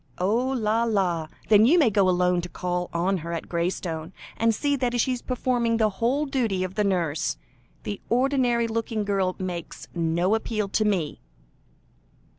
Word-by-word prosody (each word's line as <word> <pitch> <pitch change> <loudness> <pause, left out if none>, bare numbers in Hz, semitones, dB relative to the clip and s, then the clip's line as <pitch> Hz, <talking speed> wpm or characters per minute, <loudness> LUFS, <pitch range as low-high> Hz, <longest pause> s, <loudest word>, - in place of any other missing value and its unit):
"Oh! 220 +8 +1
la, 230 -3 +1
la! 185 -8 0 0.2
then 210 -1 +7
you 330 +7 +5
may 280 -10 +4
go 195 -2 +3
alone 180 0 +2
to 180 - -7
call 180 0 -3
on 180 +3 0
her 170 0 -6
at 165 - -4
Graystone, 170 -1 -3 0.2
and 230 - +2
see 285 +5 +1
that 245 -2 0
she 260 - +2
is 250 - -3
performing 245 -2 0
the 215 -2 +2
whole 270 +6 +2
duty 230 -9 0
of 185 0 -4
the 210 - +1
nurse. 170 -6 0 0.5
The 205 - -5
ordinary 245 -2 +2
looking 225 -1 -2
girl 195 -2 0
makes 180 -3 -6
no 170 +3 +1
appeal 215 -2 -1
to 215 +2 +1
me." 180 -8 0
205 Hz, 170 wpm, -25 LUFS, 180-235 Hz, 0.5 s, then